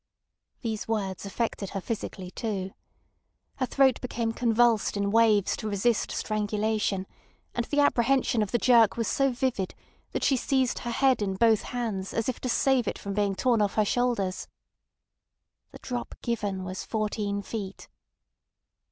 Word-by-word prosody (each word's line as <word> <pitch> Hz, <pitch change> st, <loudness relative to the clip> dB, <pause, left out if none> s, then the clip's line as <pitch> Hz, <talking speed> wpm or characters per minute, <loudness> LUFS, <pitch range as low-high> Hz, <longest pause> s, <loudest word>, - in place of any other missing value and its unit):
These 220 Hz, -3 st, -3 dB
words 200 Hz, -3 st, -2 dB
affected 200 Hz, -1 st, -2 dB
her -, -, -1 dB
physically 190 Hz, -3 st, -5 dB
too. 195 Hz, -3 st, -3 dB, 0.9 s
Her 255 Hz, -, 0 dB
throat 265 Hz, -2 st, +3 dB
became 235 Hz, -2 st, -2 dB
convulsed 230 Hz, -3 st, +2 dB
in 200 Hz, 0 st, 0 dB
waves 215 Hz, -3 st, +4 dB
to 215 Hz, -, -4 dB
resist 210 Hz, +3 st, +1 dB
strangulation; 210 Hz, -2 st, -1 dB, 0.5 s
and 235 Hz, -, -1 dB
the 290 Hz, 0 st, +2 dB
apprehension 255 Hz, -3 st, +2 dB
of 210 Hz, -, 0 dB
the 240 Hz, -, +1 dB
jerk 235 Hz, -2 st, +5 dB
was 230 Hz, -2 st, 0 dB
so 275 Hz, 0 st, +2 dB
vivid 245 Hz, -7 st, -2 dB, 0.4 s
that -, -, -3 dB
she 270 Hz, -, +3 dB
seized 260 Hz, 0 st, +1 dB
her 240 Hz, -, -5 dB
head 260 Hz, 0 st, +2 dB
in 195 Hz, -2 st, -1 dB
both 220 Hz, +1 st, +4 dB
hands 220 Hz, -6 st, -4 dB
as 225 Hz, -, 0 dB
if 255 Hz, -, -2 dB
to 255 Hz, -, -3 dB
save 255 Hz, -2 st, +2 dB
it -, -, -2 dB
from 200 Hz, -, -5 dB
being 200 Hz, -1 st, +1 dB
torn 235 Hz, 0 st, +2 dB
off 205 Hz, -1 st, 0 dB
her 215 Hz, -, +3 dB
shoulders. 220 Hz, -5 st, 0 dB, 1.2 s
"The -, -, -12 dB
drop 245 Hz, -2 st, -5 dB
given 205 Hz, -5 st, -2 dB
was 185 Hz, 0 st, -5 dB
fourteen 210 Hz, -2 st, -2 dB
feet." 200 Hz, -2 st, -6 dB
220 Hz, 155 wpm, -27 LUFS, 200-240 Hz, 1.2 s, jerk